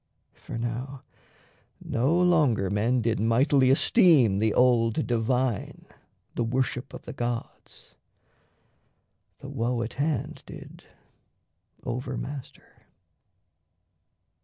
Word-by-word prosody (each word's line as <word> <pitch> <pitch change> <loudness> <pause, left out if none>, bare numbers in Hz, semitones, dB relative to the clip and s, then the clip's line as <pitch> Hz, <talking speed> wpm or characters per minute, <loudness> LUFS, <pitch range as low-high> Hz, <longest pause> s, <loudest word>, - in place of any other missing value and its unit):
For - - -8
now 125 +3 -5 0.8
no 135 +9 0
longer 150 - +2
men 115 +4 +1
Did 115 -2 0
mightily 130 +4 +3
esteem 135 - +4
the 110 0 +2
old 115 -2 +2
Divine, 120 -1 -1 0.5
The - - -1
worship 130 +2 -2
of - - -10
the - - -8
gods: 120 -1 -6 1.4
the 140 - -10
woe 120 -3 -1
at 115 - -6
hand 150 -5 -2
Did - - -12 1.0
over 125 +1 -4
master. 140 -2 -9
125 Hz, 95 wpm, -26 LUFS, 115-135 Hz, 1.4 s, esteem